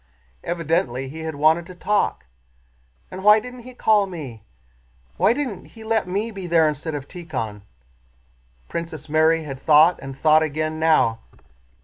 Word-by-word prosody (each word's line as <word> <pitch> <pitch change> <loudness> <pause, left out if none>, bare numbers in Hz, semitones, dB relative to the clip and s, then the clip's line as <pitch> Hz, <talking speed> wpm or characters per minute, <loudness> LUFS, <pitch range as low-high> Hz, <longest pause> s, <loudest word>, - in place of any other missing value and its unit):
Evidently 165 -6 -1
he 160 +4 -9
had 160 -1 -5
wanted 160 +4 +2
to 185 - -11
talk. 205 +3 0 0.9
"And 185 +1 -7
why 210 +1 +7
didn't 250 +3 -10
he 250 +1 -12
call 210 -4 +3
me? 145 - -8 0.8
Why - - +4
didn't 240 -8 -3
he 225 - -14
let 220 -3 0
me 205 +5 -2
be 195 -4 -7
there 165 -2 +4
instead 150 +1 -3
of 140 -1 -6
Tíkhon?" 130 - -6 1.1
Princess 165 -3 -6
Mary 160 +1 +3
had 135 -3 -7
thought 155 +3 +5
and 135 -1 -8
thought 155 +2 +4
again 155 0 -2
now. 155 -8 +3
160 Hz, 150 wpm, -22 LUFS, 150-190 Hz, 1.1 s, why